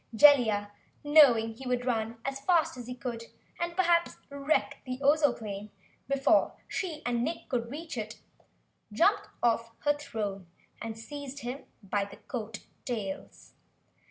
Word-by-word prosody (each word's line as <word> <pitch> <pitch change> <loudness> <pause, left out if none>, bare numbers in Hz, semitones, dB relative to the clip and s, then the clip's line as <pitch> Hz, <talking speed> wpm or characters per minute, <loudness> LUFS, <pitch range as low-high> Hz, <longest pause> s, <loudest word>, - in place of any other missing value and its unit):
Jellia, 220 -7 +6 0.3
knowing 265 -7 +6
he 260 +3 -9
would 250 0 0
run 230 -2 -1
as 270 0 -2
fast 330 +1 +2
as 245 -2 -8
he 250 - -5
could 235 -2 -5 0.3
and 345 0 -2
perhaps 345 -2 +3
wreck 280 +2 0
the 255 -1 -4
Ozoplane 245 -8 +1 0.4
before 275 -1 +3
she 320 -5 -3
and 240 -1 +1
Nick 325 +5 -3
could 235 -2 -1
reach 295 -1 -5
it, 215 0 -6 0.7
jumped - - +3 0.2
off 230 -1 +2
her 290 - +3
throne 205 -10 -4 0.3
and 225 0 -5
seized 285 +3 -7
him 255 +3 -5 0.2
by 200 +1 0
the 200 - -12
coat 225 -3 -6 0.2
tails. 210 -6 -5
250 Hz, 140 wpm, -30 LUFS, 225-290 Hz, 0.7 s, Jellia